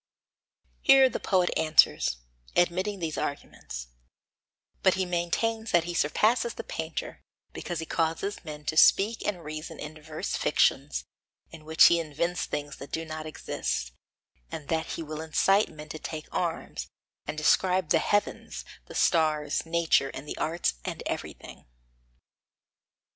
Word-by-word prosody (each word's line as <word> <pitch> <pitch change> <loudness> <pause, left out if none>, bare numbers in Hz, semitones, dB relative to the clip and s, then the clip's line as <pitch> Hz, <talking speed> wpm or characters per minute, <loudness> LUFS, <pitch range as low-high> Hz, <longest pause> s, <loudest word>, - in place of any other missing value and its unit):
Here 270 -1 +7
the - - -4
poet 185 -3 +2
answers, 155 - +4 0.4
admitting 185 +4 +1
these 165 -4 -3
arguments; 60 - -5 0.9
but 190 - +4
he 190 0 0
maintains 220 +6 -1
that 175 -4 +4
he 175 +1 -4
surpasses 225 +10 +2
the - - -6
painter, 160 0 -5 0.3
because 175 - -4
he 160 - -3
causes 165 +5 -1
men 150 -2 -8
to 155 - -1
speak 205 +7 +5
and 185 -5 -2
reason 155 +1 -6
in 150 +1 -7
diverse 155 0 -5
fictions, - - +1 0.5
in 155 - -12
which 160 +1 +5
he 170 - +7
invents 165 +3 -2
things 145 -1 -4
which 140 - -8
do 165 0 -3
not 155 0 -6
exist, 60 - -3 0.6
and 150 - -7
that 160 -1 0
he 165 - -4
will 155 0 -6
incite 195 +6 +3
men 150 0 -11
to 155 - -6
take 155 0 -6
arms, 165 - -3 0.4
and - - -4
describe 180 +2 +3
the 165 - +4
heavens, 205 +5 -1 0.2
the - - -10
stars, 155 -2 +2
nature, 165 -4 +2
and 150 - -8
the - - -5
arts 165 +3 0
and - - -5
everything. - - -6
160 Hz, 145 wpm, -28 LUFS, 155-180 Hz, 0.9 s, Here